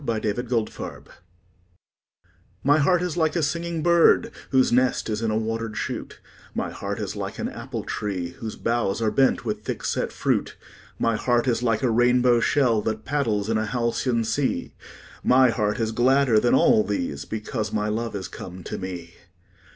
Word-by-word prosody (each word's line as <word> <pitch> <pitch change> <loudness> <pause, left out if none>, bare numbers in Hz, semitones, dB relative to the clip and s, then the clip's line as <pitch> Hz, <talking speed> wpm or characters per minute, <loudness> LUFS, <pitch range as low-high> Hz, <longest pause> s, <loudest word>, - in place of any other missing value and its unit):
A - - -13
Birthday 110 -4 -1 2.3
MY 145 +3 +4
heart 175 +5 +3
is 180 -2 -3
like 160 -1 +1
a 170 - +1
singing 170 +1 -2
bird 170 -1 +4 0.2
Whose 130 -1 +3
nest 125 -2 +2
is 105 +1 -2
in 115 - 0
a 110 - +1
water'd 115 0 -3
shoot; - - -5 0.4
My - - -2
heart - - -5
is - - -4
like - - -5
an - - -2
apple - - -6
tree 95 -4 -3
Whose 110 +3 -7
boughs 115 -4 0
are 110 -2 +1
bent 135 -2 +2
with 105 -2 -2
thick - - -4
set - - -1
fruit; - - -1 0.4
My 115 -1 +1
heart 120 +2 +1
is 120 -1 +1
like 115 0 +1
a 125 - +2
rainbow 120 +1 +4
shell 120 -4 +2
5 - - -13
That 110 0 -2
paddles 115 -8 0
in 110 -1 +1
a 110 - -2
halcyon 120 +1 0
sea; 115 +5 -1 0.5
My 130 -1 +5
heart 105 -2 -1
is 110 -1 0
gladder 125 0 +4
than 120 - +3
all 110 - +5
these, 85 -9 -3
Because 110 0 -4
my 105 0 -1
love 110 +1 -2
is 95 -3 -4
come 90 -1 -9
to - - -5
me. 90 -3 -6
115 Hz, 180 wpm, -24 LUFS, 105-130 Hz, 2.3 s, My